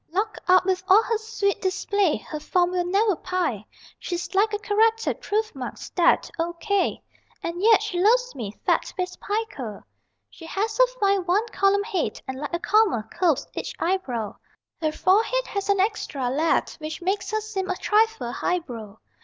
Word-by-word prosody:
Locked 410 +6 -2
up 370 0 +5
with 375 -1 +1
all 400 +3 +7
her 455 - 0
sweet 440 -3 -1
display 385 -2 +1
Her 305 - -7
form 355 +3 +1
will 360 -1 0
never 400 +2 +2
pi. 345 - -2 0.4
She's 355 +1 -4
like 415 +3 +3
a 415 - 0
Corrected 445 +2 +1
proof 430 +1 -1
marked 260 -3 -6
stet, 350 - +2
O. 340 +1 -1
K. 400 +3 -1 0.4
And 340 +1 -3
yet 445 +2 +5
she 350 - -2
loves - - +3
me, 220 -6 -5
fatface 365 -1 0
=Pica!= 405 - -4 0.5
She 325 - -12
has 430 +6 -2
a - - +7
fine 395 -2 +2
one 405 +6 +2
column 400 +1 +2
head, 400 -6 -2
And 260 0 -5
like 295 - -4
a 345 - -1
comma 400 - +2
curves 335 -6 +1
each - - -5
eyebrow 260 - -2 0.4
Her 310 -1 +1
forehead 445 +9 +2
has 400 0 -4
an 400 -1 +3
extra 305 - -1
lead 310 +5 +1
Which 310 +2 -6
makes 395 +2 -1
her 435 - 0
seem 420 -3 -4
a 370 - 0
trifle 435 - +1
highbrow. 235 - -3
380 Hz, 170 wpm, -24 LUFS, 335-425 Hz, 0.5 s, all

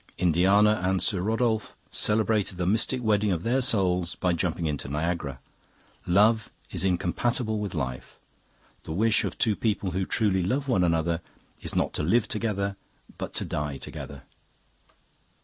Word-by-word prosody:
Indiana 95 +5 +4
and 95 0 +1
Sir 90 +1 0
Rodolphe 110 +1 0 0.2
celebrated 105 -3 +1
the 90 - -1
mystic 115 +6 +2
wedding 105 -2 +2
of 85 -2 -1
their 125 +3 +1
souls 90 -7 +2
by 90 -1 0
jumping 85 -1 -1
into 75 -4 -2
Niagara. 75 -2 -2 0.7
Love 105 +5 +4 0.2
is 90 -2 0
incompatible 110 +5 0
with 100 -3 -4
life. 65 -4 -4 0.7
The 80 - -4
wish 110 +5 +3
of - - -4
two 110 -3 +2
people 105 -4 -1
who 95 +2 -2
truly 100 -4 +2
love 135 +10 -1
one 95 -9 +2
another 85 0 +1 0.4
is - - -4
not - - +1
to - - -1
live 105 +9 +2
together 100 -3 -2 0.4
but - - -4
to - - -1
die 75 -2 -3
together. - - -8
95 Hz, 150 wpm, -27 LUFS, 85-110 Hz, 0.7 s, Indiana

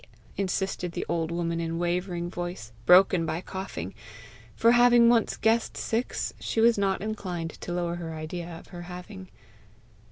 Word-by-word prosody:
insisted 190 -2 -2
the - - -3
old 165 -1 -1
woman 170 0 -1
in 165 0 -2
wavering 175 0 -1
voice, 175 -9 -5 0.2
broken 180 -1 +7
by 160 0 -2
coughing; 180 - -6 0.6
for, 230 - +5
having 240 -1 +6
once 235 -2 +2
guessed 225 +1 +1
six, 230 +3 -2
she - - -2
was 230 +1 +6
not 195 -1 0
inclined 185 -6 -4
to - - -8
lower 175 -1 -1
her 165 -2 -5
idea 165 +2 -5
of - - -15
her 175 -2 -8
having. 175 - -9
175 Hz, 155 wpm, -27 LUFS, 170-200 Hz, 0.6 s, broken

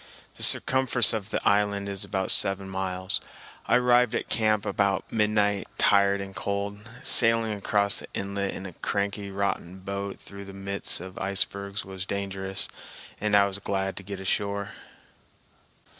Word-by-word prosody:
The - - -11
circumference 130 -4 +5
of 110 -2 -4
the - - -2
island 100 0 +2
is 100 0 -4
about 95 -1 +3
seven 95 0 +2
miles. 95 -1 -3 0.5
I - - +4
arrived 125 -1 +4
at - - -3
camp 110 -2 +2
about 100 -1 0
midnight, 105 -2 +1
tired 100 -1 +4
and 95 -1 -8
cold. 100 +1 -4
Sailing 115 -2 +4
across 100 0 +1
the - - -9
inlet 100 0 -3
in 95 - -7
a 95 - -8
cranky 100 +2 -3
rotten 95 -2 -3
boat 100 +1 -5
through 100 0 -11
the 100 - -10
midst 100 -2 -1
of 95 +1 -9
icebergs 100 +1 -1
was 95 0 -6
dangerous, 95 -1 -2 0.5
and 105 0 +1
I 100 0 +6
was 100 0 -2
glad 95 -1 -2
to - - -3
get 100 0 -7
ashore. 100 +1 -2
100 Hz, 155 wpm, -26 LUFS, 95-105 Hz, 0.5 s, I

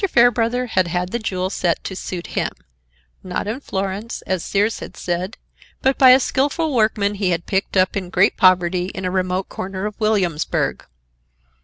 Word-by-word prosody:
Fairbrother 240 0 +3
had 185 -6 +1
had 175 +1 -2
the 235 - -1
jewel 185 -4 -2
set 175 -3 0
to 190 - -5
suit 180 -1 -5
him, - - 0 0.7
not 185 +2 -3
in 225 +5 -3
Florence, 200 -1 -4
as 185 -3 -2
Sears 210 +3 0
had - - -9
said, 180 +4 -3 0.5
but 265 0 +3
by 260 - +8
a 255 +1 +8
skilful 285 +4 0
workman 215 -3 +2
he 195 -2 -1
had 170 -1 -1
picked 195 0 -1
up 185 0 +3
in 185 -3 -3
great 185 +3 +3
poverty 180 -2 +3
in 190 - -4
a 180 - -1
remote 185 0 -1
corner 190 +1 -5
of 210 - -3
Williamsburg. 195 -8 0
195 Hz, 175 wpm, -20 LUFS, 185-225 Hz, 0.7 s, by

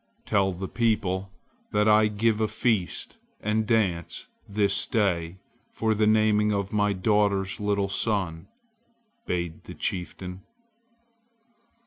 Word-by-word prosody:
"Tell 95 -1 +2
the 95 +1 -5
people 100 -5 0 0.4
that 105 0 +3
I 105 0 +6
give 110 +1 +1
a 110 - +2
feast 105 -3 -1 0.2
and 110 +1 0
dance 95 -8 0 0.2
this 100 -1 +3
day 90 -5 0 0.3
for 110 -1 0
the 105 0 +2
naming 105 -1 +3
of 100 -1 -2
my 105 -1 +2
daughter's 100 0 +1
little 100 -1 0
son," 95 -5 -1 0.8
bade 85 -2 -3
the - - -9
chieftain. 90 +1 -4
105 Hz, 115 wpm, -26 LUFS, 95-110 Hz, 0.8 s, I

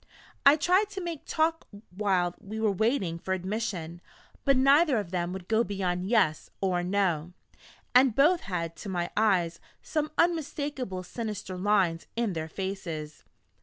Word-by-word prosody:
I 280 - +9
tried 365 +7 +2
to 400 -1 -6
make 335 -4 -5
them - - -19
talk 325 +1 +1 0.3
while 185 -4 +1
we 215 +3 -7
were 220 -2 +2
waiting 195 -5 0
for 190 +2 -1
admission, 185 -3 -4 0.4
but 275 -2 +4
neither 275 +1 +5
of 200 -5 -3
them 175 -1 -1
would 185 -1 -7
go 225 +1 +3
beyond 185 -3 -2
"Yes," 195 -9 +2
or 185 -2 +1
"No"; 175 -3 0 0.6
and 250 -2 +5
both 325 +6 +5
had, 170 -3 -3
to 205 - -7
my 175 -2 -2
eyes, 180 -6 +2 0.2
some 305 -1 -1
unmistakably 285 - -1
sinister 205 -1 -5
lines 185 -3 +1
in 230 -4 0
their 160 -1 -4
faces. 170 -5 -5
200 Hz, 155 wpm, -28 LUFS, 180-260 Hz, 0.6 s, I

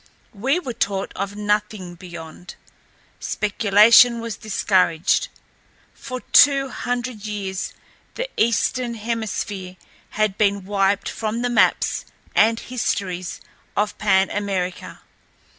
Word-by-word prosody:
We 265 - 0
were 265 -9 -5
taught 195 -3 -2
of 200 +1 -4
nothing 210 -3 -2
beyond. 170 -1 -10 0.6
Speculation 215 +3 +5
was 230 -2 -5
discouraged. 190 - +1 0.7
For 255 -1 -7
two 275 -2 +6
hundred 245 -4 -4
years 195 -2 -4 0.4
the - - -3
Eastern 235 +1 +1
Hemisphere 210 -4 -4 0.4
had 215 -2 0
been 200 -2 +1
wiped 200 0 +1
from 225 +2 -3
the 245 - 0
maps 230 - +2 0.3
and 225 +1 +4
histories 185 -7 -3 0.4
of 210 0 0
Pan 195 -2 +3
America. 190 -3 -3
210 Hz, 105 wpm, -22 LUFS, 195-235 Hz, 0.7 s, two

